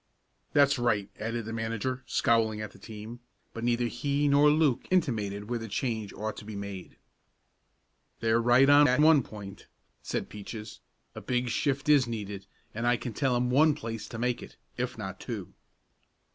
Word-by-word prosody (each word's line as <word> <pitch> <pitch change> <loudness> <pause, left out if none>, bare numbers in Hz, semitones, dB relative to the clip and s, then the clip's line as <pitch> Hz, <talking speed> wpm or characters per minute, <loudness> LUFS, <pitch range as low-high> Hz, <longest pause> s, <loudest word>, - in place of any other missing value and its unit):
"That's 140 -1 +4
right," 105 -5 0
added 115 +1 -3
the 110 - -5
manager 115 +3 -2
scowling 110 -2 +2
at 105 -1 -5
the - - -17
team, 110 +3 -9 0.3
but 115 - -6
neither 120 0 +1
he 140 +4 0
nor 145 +1 +5
Luke 150 -4 +2
intimated 105 - 0
where 120 0 -2
the 115 - -6
change 110 -1 -2
ought 110 +1 -4
to - - -8
be 105 0 -8
made. 100 -2 -7 1.2
"They're 115 +1 +2
right 120 +3 +5
on 145 +1 +7
that 125 +2 +3
one 155 -1 +6
point," 105 -4 -10 0.3
said - - -3
Peaches, 105 +1 -8 0.3
"a - - -8
big 125 -1 -1
shift 135 +3 -1
is 145 -4 +5
needed, 100 -4 -5 0.3
and 115 +2 -2
I 120 0 +3
can 120 -2 -6
tell 130 +2 +1
'em 125 0 +1
one 150 +3 +5
place 115 -5 -6
to 115 - -7
make 120 +1 -1
it, - - -12 0.2
if - - -3
not - - -6
two." - - -6
115 Hz, 175 wpm, -29 LUFS, 110-130 Hz, 1.2 s, on